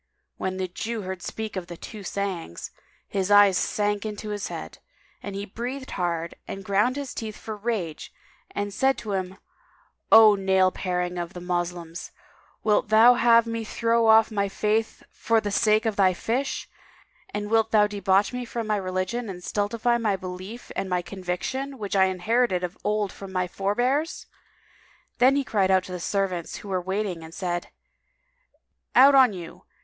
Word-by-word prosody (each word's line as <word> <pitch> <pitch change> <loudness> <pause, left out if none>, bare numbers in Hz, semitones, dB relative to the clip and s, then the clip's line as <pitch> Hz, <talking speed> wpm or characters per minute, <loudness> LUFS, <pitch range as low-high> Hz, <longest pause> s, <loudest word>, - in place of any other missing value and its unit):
When 185 0 -3
the 185 -1 -2
Jew 220 +4 -4
heard 190 -1 -5
speak 220 +2 -5
of 185 -2 -4
the 175 - -8
"Two 215 +3 -9
Sayings," 190 - -4 0.4
his 195 -1 -2
eyes 205 -2 +7
sank 205 +1 0
into 215 0 -5
his 205 -1 -3
head, - - -7 0.4
he 200 0 -5
breathed 250 +6 -6
hard 170 -2 -2
and 195 -1 -7
ground 205 +6 +2
his 280 -2 -5
teeth 220 -2 -6
for 220 - -6
rage 205 -7 -3 0.4
and 205 0 -4
said 265 +5 +2
to 215 - -6
him, 190 -1 -3 0.7
"O 220 -1 +9
nail 190 -1 +3
paring 180 -1 -2
of 175 +1 -5
the 180 - -7
Moslems, 175 -1 -4 0.5
wilt 210 -1 +2
thou 225 +3 +7
have 235 -1 +5
me 230 0 -3
throw 230 +1 +1
off 220 0 +6
my 200 -2 0
faith 215 +3 -1
for 230 -1 +1
the 205 -1 -3
sake 215 +2 +3
of 220 -2 -1
thy 190 -2 +4
fish, 255 +9 -2 0.6
and 205 +1 -4
wilt 225 -1 +3
thou 210 -2 +5
debauch 200 0 +1
me 250 0 -3
from 235 -1 -4
my 215 -1 0
religion 190 +5 -2
and 180 -2 -7
stultify 230 +5 0
my 215 -4 +1
belief 185 +5 -8
and 195 - -2
my 180 -1 0
conviction 195 +10 -4
which 205 -3 -4
I 190 -1 +5
inherited 190 +1 +1
of 180 +2 -3
old 210 -1 0
from 195 -1 -9
my 185 -1 0
forbears?" 245 - -1 0.9
Then 260 +2 +5
he 280 - +1
cried 200 -6 +1
out 190 -1 +4
to 185 - -10
the 180 - -4
servants 185 -2 -2
who 205 - -9
were 185 -1 0
in - - -18
waiting 190 -3 -2
and 160 +1 -11
said, 175 -2 -3 1.3
"Out 275 +2 +8
on 260 -4 +7
you! 175 -4 -9
205 Hz, 175 wpm, -25 LUFS, 185-225 Hz, 1.3 s, O